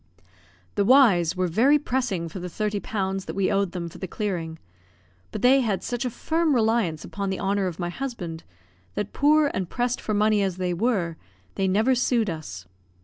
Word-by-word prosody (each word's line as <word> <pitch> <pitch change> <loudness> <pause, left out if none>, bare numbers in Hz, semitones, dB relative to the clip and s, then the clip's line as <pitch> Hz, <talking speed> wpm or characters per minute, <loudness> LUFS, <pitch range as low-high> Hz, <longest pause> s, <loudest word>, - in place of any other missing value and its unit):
The 205 - +1
Y 255 -4 +6
y's 170 0 -1
were 185 0 0
very 235 - +4
pressing 245 - -2
for 175 +4 -7
the 180 0 -5
thirty 210 +2 -2
pounds 195 -2 -3
that - - -6
we 195 -1 +1
owed 195 -2 +1
them 175 -2 -4
for 170 - -11
the 190 - -4
clearing; 175 -5 -3 0.7
but - - -6
they 260 +2 +6
had 210 -6 -1
such 245 0 -3
a - - 0
firm 320 +4 0
reliance 220 -9 +1
upon 200 -1 -4
the 190 - -2
honour 195 0 0
of 170 -3 -5
my 175 -1 -3
husband, 175 -8 -5 0.5
that, 205 - -3
poor 295 +1 +4
and 185 -3 -3
pressed 245 0 -1
for 215 - -2
money 210 0 +3
as 190 -2 -1
they 180 -1 -1
were, 175 -5 0 0.4
they 195 - 0
never 215 +7 +3
sued 240 -5 +1
us. 120 - -7
200 Hz, 200 wpm, -25 LUFS, 180-240 Hz, 0.7 s, Y